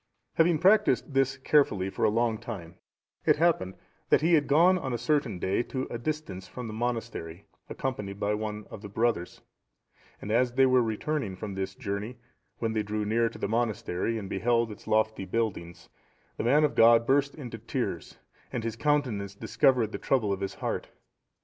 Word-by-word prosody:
Having 165 0 +3
practised 195 -3 +3
this 135 0 +2
carefully 130 -9 +2
for - - -3
a - - +5
long 115 0 +1
time, 100 -9 -7 0.5
it - - +4
happened 150 - +1 0.3
that - - +5
he 165 +3 +3
had 150 -3 +4
gone 170 +6 +5
on 130 -6 -4
a - - 0
certain 125 -3 0
day 95 +5 0
to 130 +1 -4
a 120 - -4
distance 115 -10 -4
from 125 - -7
the 110 - -6
monastery, 110 -7 -4 0.2
accompanied 105 -7 -4
by 105 +1 0
one 105 0 -4 0.2
the 105 - -8
brothers; 110 -4 -1 0.8
and 105 - -6
as 120 +2 +2
they 135 +1 +5
were 130 -1 +4
returning 115 -1 -2
from 100 +1 -6
this 95 0 -4
journey, 110 0 -4 0.4
when 115 -1 -2
they 110 - +1
drew 105 0 -3
near 115 +2 +2
to - - -11
the - - -2
monastery, 115 -1 -1
and 100 -3 -5
beheld 115 +4 +1
its 105 - -12
lofty 110 -1 +1
buildings, 95 -5 -3 0.5
the - - -3
man 140 +6 +4
of 150 - +2
God 115 0 +6
burst 140 +2 +2
into 130 -6 -7
tears, - - -4 0.3
and 120 - -3
his 115 -1 -3
countenance 115 -9 0
discovered 115 +1 +2
the - - -5
trouble 110 -7 +1
of 95 - -4
his 95 - -3
heart. - - -3
115 Hz, 180 wpm, -28 LUFS, 105-135 Hz, 0.8 s, God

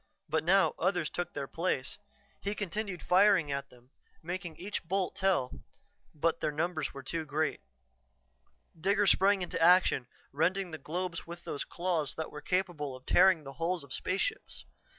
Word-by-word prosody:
But 160 0 0
now 190 +3 +4
others 175 -2 +1
took 175 - -3
their 140 -1 -3
place; 150 -2 -2 0.4
he 200 +1 -2
continued 205 -1 -4
firing 185 -5 +4
at 140 0 -3
them, 125 +1 -20 0.3
making 175 -1 -5
each 205 +3 -4
bolt 185 +2 -1
tell, 190 -10 +1 0.6
but 165 +2 +1
the - - 0
numbers 155 -1 -1
were 140 - -9
too 160 +4 -3
great. 155 +1 -1 1.2
Digger 200 +5 +2
sprang 195 0 +4
into 170 - -3
action, 175 -7 +5 0.2
rending 180 +5 0
the 160 - -6
globes 170 +3 -4
with 170 +1 -8
those 140 - -3
claws 170 -5 -1
that 160 - -4
were 150 - -8
capable 175 -7 -1
of 130 0 -14
tearing 185 -4 +5
the 135 -1 -8
hulls 170 -1 0
of 140 - -9
spaceships. 190 - -2
170 Hz, 160 wpm, -31 LUFS, 150-185 Hz, 1.2 s, action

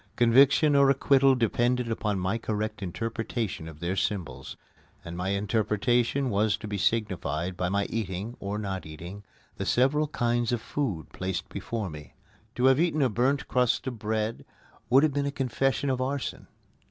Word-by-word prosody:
Conviction 140 +5 +5
or 140 -1 +6
acquittal 135 0 +4
depended 120 +1 +1
upon 105 -2 -1
my 95 +5 -1
correct 110 -1 -3
interpretation 110 -1 -3
of 80 -2 -10
their 90 +2 -1
symbols, 100 -3 -3 0.5
and 85 - -6
my 90 +2 -2
interpretation 115 +6 +1
was 105 +1 +2
to 110 - -8
be 105 -1 -3
signified 95 -6 -1
by 90 0 -1
my 100 +1 +1
eating, 105 +1 -4
or 100 +1 -3
not 95 -3 -4
eating, 85 +6 -9 0.3
the - - -3
several 145 +5 +3
kinds 120 -5 0
of 120 - 0
food 110 - -3
placed 95 -1 -3
before 110 -4 -4
me. 75 -1 -11 0.4
To 125 - +1
have 130 +1 +5
eaten 160 -3 +2
a 130 - +3
burnt 130 +5 +1
crust 125 -1 +1
of 125 -4 -4
bread 110 +1 -2 0.5
would 135 +4 +6
have 155 -3 +2
been 140 0 0
a - - -1
confession 135 +1 0
of 130 -1 -1
arson. 135 +1 -3
115 Hz, 165 wpm, -27 LUFS, 100-130 Hz, 0.5 s, or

